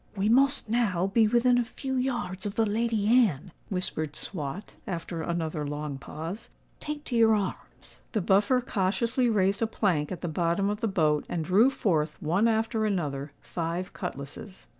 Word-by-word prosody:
"We 200 +1 +1
must 275 +3 +3
now 215 -6 +1
be 215 +3 +3
within 245 +2 +4
a - - +2
few 265 +3 -5
yards 240 -7 -2
of 200 - -5
the 225 - +3
Lady 220 0 0
Anne," 210 - +3 0.2
whispered 155 -5 -3
Swot, 165 +3 -5
after 170 -1 -4
another 160 -2 -2
long 145 -1 -4
pause: 165 - -7 0.3
"take 295 0 -5
to 245 - -4
your 225 -1 +5
arms." 200 -3 -5
The 215 - +1
Buffer 205 +8 +3
cautiously 235 +4 0
raised 200 0 +2
a 225 - +2
plank 175 -9 0
at 180 - -5
the 175 - -2
bottom 170 +4 +1
of 210 +2 -4
the 225 - +1
boat, 155 -7 +1
and 165 -3 -2
drew 205 +9 +5
forth, 160 - 0
one 175 +9 +2
after 225 0 +1
another, 150 -9 -1
five 170 +2 -4
cutlasses. 175 +3 -7
195 Hz, 170 wpm, -28 LUFS, 165-225 Hz, 0.3 s, your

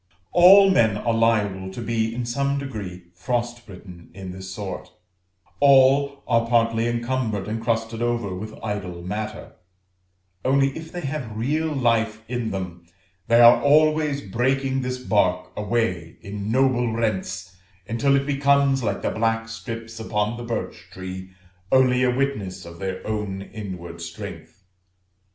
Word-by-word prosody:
All 195 +3 +8
men 110 - +3
are 115 +2 0
liable 105 -4 +1
to 95 - -8
be 115 -1 -1
in 120 0 -3
some 140 +4 0
degree 100 -10 -7
frost 120 +4 -3
bitten 90 -3 -12
in 95 -2 -7
this 95 0 -8
sort; 95 -2 -6 0.7
all 140 0 +5
are 115 0 +2
partly 115 -1 +2
encumbered 120 -4 -1
and 110 +1 -3
crusted 115 0 -1
over 120 -5 -1
with 110 +4 -7
idle 95 -5 -4
matter; 105 +4 -5 0.9
only, 135 +1 +2
if 160 0 -8
they 175 - -5
have 135 -7 -4
real 150 +8 0
life 115 -5 +1
in 120 -2 -2
them, 90 -3 -6 0.4
they 115 0 +5
are 120 0 +8
always 150 0 +3
breaking 130 +6 0
this 125 0 -3
bark 90 -7 +1
away 105 -6 -1
in 100 +1 -5
noble 125 -2 +2
rents, 95 -5 -2 0.3
until 115 +5 +2
it 140 0 +1
becomes, 140 -1 +3
like 115 - -2
the - - 0
black 115 0 0
strips 115 +1 -7
upon 105 0 -1
the 120 - -7
birch 120 -1 -5
tree, 95 0 -7 0.4
only 130 -1 +4
a 125 - +3
witness 105 -9 -2
of 85 0 -11
their 95 -1 -4
own 105 -3 -3
inward 90 -5 -8
strength. 90 - -9
115 Hz, 145 wpm, -23 LUFS, 100-130 Hz, 0.9 s, All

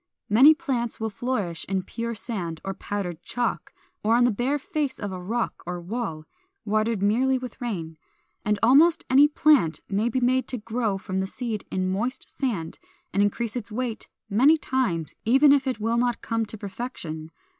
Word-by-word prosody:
Many 270 +9 +8
plants 260 -8 -2
will 220 -1 -2
flourish 205 -9 -2
in 190 -1 0
pure 235 +2 -4
sand 180 -8 -4
or 195 - -2
powdered 185 -5 -4
chalk, 240 +3 -2 0.3
or 225 +2 +4
on 245 - +4
the 245 - +4
bare 250 +7 0
face 295 -3 -2
of 205 -2 -4
a 185 -1 -6
rock 230 +6 -2
or 180 0 -3
wall, 175 -4 -4 0.4
watered 215 -1 0
merely 255 +6 +3
with 250 0 -8
rain. 170 -9 -4 0.5
And 210 0 +1
almost 300 +8 +5
any 280 +3 +7
plant 295 - +3
may 210 +4 0
be 255 - 0
made 255 +1 +2
to 255 - -3
grow 220 -2 -1
from 190 0 -3
the 190 - -1
seed 225 -1 -4
in 185 0 -1
moist 235 +7 -2
sand, 205 - -2 0.3
and 200 - +2
increase 220 +3 0
its 230 -3 -5
weight 240 0 -3 0.2
many 260 +10 +5
times, 210 - -1
even 270 +5 +6
if 280 -1 +2
it 255 -4 -1
will 225 +2 0
not 240 0 0
come 225 -1 -1
to 220 - -7
perfection. 195 - -6
230 Hz, 180 wpm, -25 LUFS, 195-255 Hz, 0.5 s, Many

